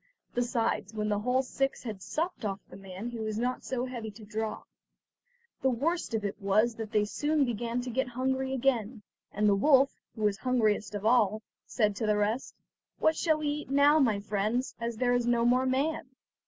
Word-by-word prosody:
Besides, 235 -3 -1
when 210 0 -1
the 205 -1 +1
whole 250 +4 +1
six 270 +1 -2
had 215 -6 -6
supped 335 - -3
off 195 -2 -2
the - - -12
man 195 +4 -7
he 235 - -6
was 215 -1 -3
not 250 +2 -1
so 255 -1 -2
heavy 240 -4 -5
to 215 +1 -12
draw. 215 +1 -4 1.0
The 265 - +3
worst 285 +2 -1
of 215 -2 -2
it 200 +2 -4
was 215 +4 +3
that 220 -2 -5
they 210 -2 +2
soon 295 +6 +1
began 235 +1 -2
to 250 0 -5
get 260 +2 0
hungry 265 +2 -1
again, 245 -4 0 0.3
and 210 +1 +1
the 205 - +5
wolf, 270 +6 +5 0.2
who 220 - -5
was 205 -1 +2
the - - -23
hungriest 215 -5 +1
of 205 0 -4
all, 220 -2 +3 0.2
said 210 -4 +1
to 220 - -1
the 210 0 +3
rest: 215 +5 -1 0.4
"What 315 - +3
shall 315 -2 +2
we 305 -1 -3
eat 295 -2 -4
now, 285 +2 +5
my 225 -8 +3
friends, 210 +5 -1
as 235 0 -3
there 245 +1 +2
is 245 -1 +1
no 235 -1 +3
more 255 +2 +3
man?" 270 +2 0
235 Hz, 205 wpm, -29 LUFS, 210-260 Hz, 1.0 s, the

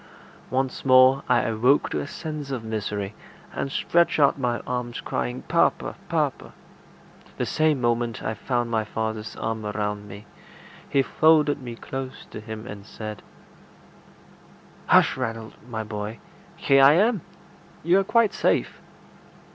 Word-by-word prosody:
Once 130 0 -1
more 130 +1 +6
I 120 -1 +4
awoke 120 +5 +2
to - - -1
a - - -4
sense 150 -2 -6
of 130 -4 -4
misery, 105 -2 -3 0.4
and 135 - -3
stretched 170 +2 +2
out 140 -2 +5
my 120 -3 -1
arms, 125 -1 -3
crying, 65 0 -3
"Papa! - - +1 0.2
papa!" - - -1 0.8
The - - -1
same 155 -3 +1
moment 120 -1 -1
I 110 - -1
found 120 +2 -2
my 110 -1 +1
father's 110 0 -4
arms 110 -1 -3
around 105 -1 -3
me; 100 +1 -10 0.6
he 135 - +3
folded 150 -1 +3
me 120 -2 -7
close 130 +2 -7
to - - -7
him, 110 +1 -8
and 100 -3 -8
said 110 0 -8 1.7
"Hush, - - +5
Ranald, 115 -1 -4 0.2
my 110 -2 -3
boy! 105 +1 -5 0.4
Here 135 -1 +4
I 140 +2 +8
am! 205 +3 +3 0.6
You 175 +4 +4
are - - +1
quite 220 +1 +3
safe." - - 0
120 Hz, 140 wpm, -24 LUFS, 110-140 Hz, 1.7 s, I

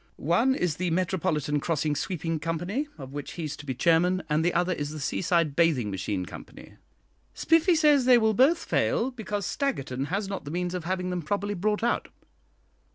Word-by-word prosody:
One 230 - +2
is 175 - -1
'The 180 0 -1
Metropolitan 165 -4 0
Crossing 150 -1 -1
Sweeping 165 -1 -2
Company,' 175 - -2
of 135 -2 -9
which 145 -1 -6
he's 155 -4 -4
to 150 - -11
be 130 - -2
chairman, 175 +6 +2
and 155 +2 +2
the 175 - +2
other 180 +2 +1
is 145 -3 -4
the 155 0 -7
'Seaside 165 0 0
Bathing 145 -11 +2
Machine 95 0 -3
Company.' - - -12 0.6
Spiffy 330 +2 +3
says 295 -4 +4
they 250 -1 +7
will 220 -1 +3
both 270 +10 +4
fail, 250 +4 +1
because 210 -5 -4
Staggerton 135 - -2
has 195 +5 -2
not 195 -1 -5
the 145 - -7
means 175 +2 -2
of 180 -3 -4
having 180 0 -2
them 180 -1 -2
properly 205 +5 -2
brought 210 +3 -1
out. 240 - 0
175 Hz, 185 wpm, -27 LUFS, 150-205 Hz, 0.6 s, they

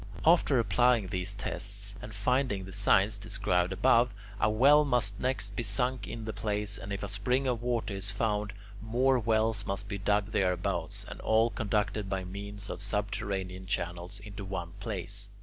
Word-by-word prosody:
After 160 -4 +5
applying 115 -1 +3
these 95 +1 -2
tests 100 +1 -3
and - - -8
finding 105 -1 0
the 95 - -9
signs 100 +1 +3
described 95 -3 +1
above, 115 +4 +3 0.2
a 110 - +3
well 140 +7 +6
must 120 -7 +1
next 105 -6 0
be - - -1
sunk 125 +4 0
in 115 0 -6
the 110 - -4
place, 105 0 -1
and 95 - -7
if 100 0 -3
a - - -2
spring 125 +7 0
of 125 -3 0
water 120 -3 -1
is 95 +1 -1
found, 105 0 0 0.3
more 125 +4 +2
wells 110 -1 +2
must 100 +1 -3
be 100 0 -4
dug 105 +1 +1
thereabouts, 90 -3 -1
and - - -8
all 110 +1 +3
conducted 105 -2 -1
by 95 -1 -1
means 100 +2 -6
of - - -5
subterranean 100 -2 -2
channels 90 +2 -3
into 100 -1 -8
one 90 -3 -4
place. 100 -2 -3
105 Hz, 170 wpm, -30 LUFS, 100-115 Hz, 0.3 s, well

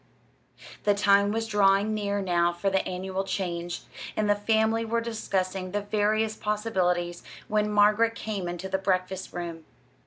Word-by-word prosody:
The 205 -1 +3
time 200 0 +4
was 225 +1 -1
drawing 205 0 +3
near 205 -1 -1
now 175 -2 +2
for 195 +3 -1
the 190 0 +2
annual 190 +1 -3
change, 175 -3 -3 0.4
and 215 - +1
the 205 - +5
family 220 +2 +1
were 230 +1 0
discussing 195 -5 -2
the 205 - 0
various 215 +1 +1
possibilities 185 -6 -1 0.3
when 210 0 +1
Margaret 210 +2 +4
came 205 -6 -4
into 175 +2 -4
the 190 0 -1
breakfast 190 0 -1
room. 170 -2 -6
200 Hz, 150 wpm, -27 LUFS, 185-215 Hz, 0.4 s, the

